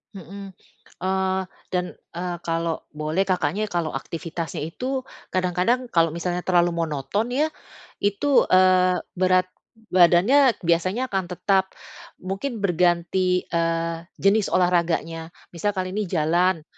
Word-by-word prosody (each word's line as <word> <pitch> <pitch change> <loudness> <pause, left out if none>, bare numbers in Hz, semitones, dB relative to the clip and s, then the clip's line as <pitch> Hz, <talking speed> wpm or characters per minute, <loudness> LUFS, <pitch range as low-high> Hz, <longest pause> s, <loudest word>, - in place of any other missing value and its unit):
Mhm. 195 +1 -9 0.5
Eee, 190 0 0 0.3
dan, 180 -1 0 0.3
eee, 175 0 -3
kalau 165 -1 -1 0.2
boleh 155 +6 -1
Kakaknya 195 +3 0
kalau 170 -5 -2
aktivitasnya 165 -2 -5
itu 255 - -3 0.3
kadang-kadang 185 +8 0
kalau 165 -1 +3
misalnya 175 +1 -2
terlalu 175 -1 +3
monoton 165 - -2
ya, 295 +4 +2 0.5
itu, 205 +8 +2
eee, 185 0 +4 0.2
berat 185 0 +3 0.5
badannya 195 +9 +5
biasanya 185 +8 +1
akan 190 -2 -1
tetap. 190 +2 0 0.5
Mungkin 205 +4 -4
berganti, 180 0 +2
eee, 165 0 0 0.2
jenis 200 +1 +3
olahraganya, 170 -2 0 0.2
misal 200 +4 -2
kali 185 -1 -2
ini 210 +1 -2
jalan, 170 +1 +1
180 Hz, 115 wpm, -23 LUFS, 170-195 Hz, 0.5 s, badannya